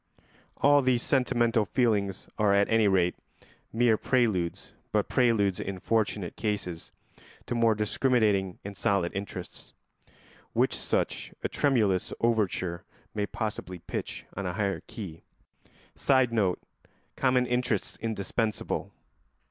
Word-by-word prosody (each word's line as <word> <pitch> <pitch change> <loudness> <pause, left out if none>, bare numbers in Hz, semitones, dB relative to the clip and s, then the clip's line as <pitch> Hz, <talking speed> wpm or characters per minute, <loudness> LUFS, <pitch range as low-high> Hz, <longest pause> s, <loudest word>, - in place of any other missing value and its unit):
All 145 0 +5
these 125 -2 +2
sentimental 120 -4 +2
feelings 100 -4 0
are 105 -2 +4
at 100 0 +4
any 115 -2 +4
rate 90 -2 +3 0.6
mere 115 -1 +3
preludes, 105 -11 0 0.2
but 105 -2 +1
preludes 110 -7 +2
in 100 -1 -4
fortunate 105 -4 0
cases 100 -6 -3 0.5
to - - -3
more 115 -2 +3
discriminating 105 -4 +1
and 100 0 -6
solid 95 -2 +1
interests, 95 -2 -7 0.8
which - - +2
such - - -2
a - - +1
tremulous 110 -10 +1
overture 100 -6 0 0.3
may 105 -1 -1
possibly 105 -5 -4
pitch 85 - -6
on 100 -1 -3
a 90 - -2
higher 100 0 -1
key. 90 -7 -8 0.7
[Sidenote: 115 -8 +2 0.6
Common 130 -1 +2
interests 125 0 -1
indispensable. 110 0 -2
105 Hz, 115 wpm, -28 LUFS, 95-120 Hz, 0.8 s, All